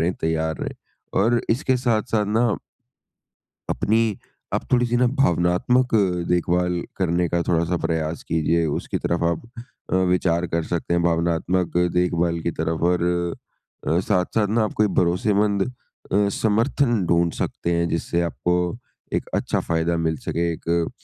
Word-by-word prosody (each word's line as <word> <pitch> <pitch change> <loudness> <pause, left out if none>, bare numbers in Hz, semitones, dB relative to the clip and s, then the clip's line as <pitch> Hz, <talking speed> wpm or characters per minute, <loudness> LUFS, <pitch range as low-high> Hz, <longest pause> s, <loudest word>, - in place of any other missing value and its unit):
रहें, 85 +2 +1
तैयार 80 -1 0
रहें। - - -4 0.5
और 120 +3 +3
इसके 130 +2 +2
साथ-साथ 110 -3 0
ना 110 +1 +2 1.1
अपनी, 110 -1 +1 0.4
आप - - -1
थोड़ी-सी 120 -1 +3
ना 125 +1 +4
भावनात्मक 90 +6 +2 0.3
देखभाल 90 0 +1 0.2
करने 90 -1 +1
का 85 0 0
थोड़ा-सा 85 0 +1
प्रयास 80 0 -1
कीजिए। 80 +1 +1
उसकी 75 - -2
तरफ 85 0 -1
आप 80 - -5 0.5
अ, - - +4
विचार 90 -2 +2
कर 85 0 -1
सकते 85 +1 -2
हैं 85 - +2
भावनात्मक 85 +1 0 0.2
देखभाल 85 -1 +1
की 85 - -1
तरफ 80 0 -1
और 90 - 0 0.9
अ, 80 +2 +3
साथ-साथ 95 +3 +1
ना 110 +1 +2
आप 105 - -3
कोई 105 - +4
भरोसेमंद 100 +3 +2
अ, - - -1 0.7
समर्थन 115 0 +2
ढूँढ 85 0 +2
सकते 85 - -2
हैं 85 0 +1
जिससे 85 +1 -1
आपको 90 +1 -1 0.6
एक - - -1
अच्छा - - 0
फ़ायदा 85 +1 0
मिल 80 -1 0
सके, 85 0 0
एक 85 +1 -1
90 Hz, 145 wpm, -23 LUFS, 85-105 Hz, 1.1 s, ना